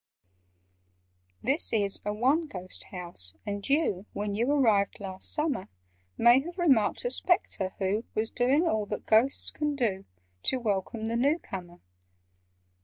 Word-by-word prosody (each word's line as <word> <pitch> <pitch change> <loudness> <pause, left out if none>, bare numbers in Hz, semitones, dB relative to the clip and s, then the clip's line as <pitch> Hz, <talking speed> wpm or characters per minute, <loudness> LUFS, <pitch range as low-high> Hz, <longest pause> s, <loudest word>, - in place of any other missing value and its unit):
"This 275 +6 +3
is 205 -3 0
a 210 - -1
'one 270 +10 +2
ghost' 185 -7 -8
house, 170 - -4
and 205 +2 -4
you 275 - +1
When 205 0 -3
you 235 +6 +1
arrived 220 -9 +2
last 190 -2 -5
summer, 300 -10 -1 0.5
May 240 +2 +6
have 345 +6 -7
remarked 285 - +2
a - - +1
Spectre 205 - +1
who 200 +4 -1
Was 220 +1 -1
doing 275 +8 +2
all 215 -7 0
that 210 - -5
Ghosts 230 +5 +3
can 295 -1 -2
do 210 -8 -1 0.4
To 260 - +1
welcome 220 0 -2
the 230 +1 -1
new 285 +6 +3
comer. 175 - -9
220 Hz, 145 wpm, -28 LUFS, 200-275 Hz, 0.5 s, May